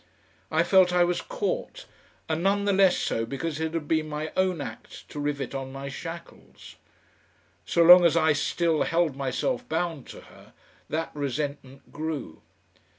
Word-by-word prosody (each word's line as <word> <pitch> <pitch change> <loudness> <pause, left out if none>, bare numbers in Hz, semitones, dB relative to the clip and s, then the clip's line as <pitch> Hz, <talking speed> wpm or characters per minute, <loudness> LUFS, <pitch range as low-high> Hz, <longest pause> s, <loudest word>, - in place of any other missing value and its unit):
I 160 +1 +2
felt 185 0 +5
I 180 0 +4
was 175 0 0
caught, - - -4 0.4
and 160 0 -1
none 200 +2 +1
the 200 - +2
less 190 -1 +4
so 115 - -1
because 140 +6 -4
it 160 +1 -2
had 155 -3 -3
been 155 -1 0
my 150 +1 -4
own 185 -3 +1
act - - -9
to 150 - -7
rivet 145 -2 -3
on 135 -1 -5
my 135 +1 -6
shackles. 165 +4 -10 0.9
So 170 - +3
long 175 +1 +9
as 170 -1 +4
I 160 -2 +4
still 160 +2 0
held 165 -4 +1
myself 245 - -2
bound 165 -4 -2
to - - -10
her - - -18 0.4
that 160 +2 -2
resentment 140 -1 -5
grew. 155 - -5
160 Hz, 160 wpm, -26 LUFS, 145-175 Hz, 0.9 s, long